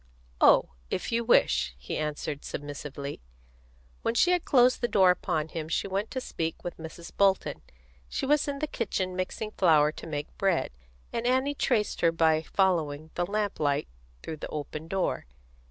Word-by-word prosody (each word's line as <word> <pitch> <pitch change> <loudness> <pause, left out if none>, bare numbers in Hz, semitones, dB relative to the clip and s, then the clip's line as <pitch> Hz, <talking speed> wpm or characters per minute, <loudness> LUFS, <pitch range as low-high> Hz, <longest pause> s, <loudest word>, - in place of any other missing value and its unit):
"Oh, - - +6 0.2
if 185 - -2
you 235 0 +1
wish," 65 - +3
he 65 +1 -5
answered 150 -1 -3
submissively. 145 - -6 0.8
When 230 - -1
she 355 +9 +4
had 360 -2 +1
closed 250 -1 +4
the 240 - +2
door 190 -5 +5
upon 160 -4 -1
him 160 -1 -5
she 165 - 0
went 195 +3 -2
to 260 - -3
speak 165 -9 -4
with 175 - -5
Mrs. 160 +1 -9
Bolton. 195 -1 +2 0.5
She - - -2
was 295 +1 +3
in 280 -1 -2
the 305 - -1
kitchen 185 -10 -2
mixing 185 +4 -3
flour 155 -7 +4
to 155 - -10
make 150 -2 -5
bread, 190 -8 +1 0.4
and 235 +1 -1
Annie 260 +3 +2
traced 235 -6 0
her 170 - +5
by 160 -1 +3
following 160 -4 0
the 175 0 -1
lamp 205 0 -1
light 145 -1 +1 0.4
through 160 - -5
the - - -6
open 155 +1 -5
door. 185 - -1
175 Hz, 170 wpm, -28 LUFS, 155-215 Hz, 0.8 s, Oh